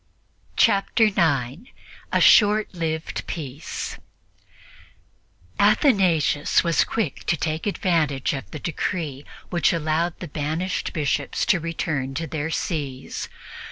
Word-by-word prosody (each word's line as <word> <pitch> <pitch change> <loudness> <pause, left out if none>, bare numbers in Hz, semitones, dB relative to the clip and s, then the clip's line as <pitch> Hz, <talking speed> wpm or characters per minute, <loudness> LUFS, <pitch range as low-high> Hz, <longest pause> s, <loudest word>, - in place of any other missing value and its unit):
Chapter 215 +2 +3
9 160 - 0 0.4
A - - +3
SHORT 210 -1 +5
LIVED 160 -2 -3
PEACE 145 -2 -5 1.6
ATHANASIUS 180 - +3
was 170 -2 +3
quick 215 - -3
to 165 - +1
take 160 +4 -2
advantage 160 -10 0
of 135 -9 -6
the - - -7
decree 155 -3 -3 0.3
which 175 -1 +3
allowed 165 +1 0
the 175 - -6
banished 155 +5 -2
Bishops 150 -3 -1
to 195 -6 +3
return 155 -5 -3
to 165 - -2
their 160 -1 -3
sees. 145 -6 -4
160 Hz, 110 wpm, -23 LUFS, 145-180 Hz, 1.6 s, SHORT